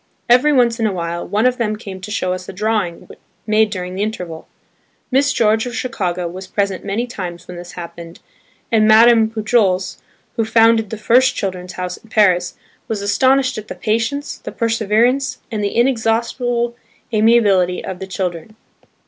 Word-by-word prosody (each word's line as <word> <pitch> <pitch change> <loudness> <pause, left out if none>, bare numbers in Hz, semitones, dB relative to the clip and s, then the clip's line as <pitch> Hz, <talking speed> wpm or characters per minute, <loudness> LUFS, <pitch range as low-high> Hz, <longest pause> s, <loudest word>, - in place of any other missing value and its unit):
Every 250 +5 +5
once 240 -4 +3
in 225 - +2
a - - -1
while, 170 -2 -4
one 210 +5 0
of 250 0 +2
them 215 -2 0
came 195 -4 -9
to 190 - -7
show 185 -4 -1
us 185 0 -7
a - - -7
drawing 210 -3 -2 0.4
made 215 0 +3
during 180 -3 -5
the 190 - -4
interval. 180 -7 -5 0.6
Miss 280 +2 +3
George 220 0 +2
of 240 - -6
Chicago 185 -9 -2
was 185 +2 -8
present 195 -1 -2
many 220 +5 -2
times 180 -8 -7
when 180 - -8
this 175 0 -9
happened, 170 -1 -9 0.5
and 215 -2 +4
Madame 225 0 +6
Pujols, 215 -4 0 0.4
who 225 - +2
founded 225 -1 +3
the 220 - -5
first 245 +5 +3
"Children's 185 -2 -4
House" 180 0 -5
in 225 - -20
Paris, 185 -5 +2 0.3
was 210 -3 -3
astonished 260 +4 +2
at 215 - -11
the - - -7
patience, 235 +7 -2
the - - -7
perseverance, 230 +4 +1
and 215 -2 -2
the 200 - -2
inexhaustible 235 0 0 0.4
amiability 210 -5 +3
of 185 - -6
the 190 - -6
children. 185 +1 -4
215 Hz, 170 wpm, -18 LUFS, 185-230 Hz, 0.6 s, Madame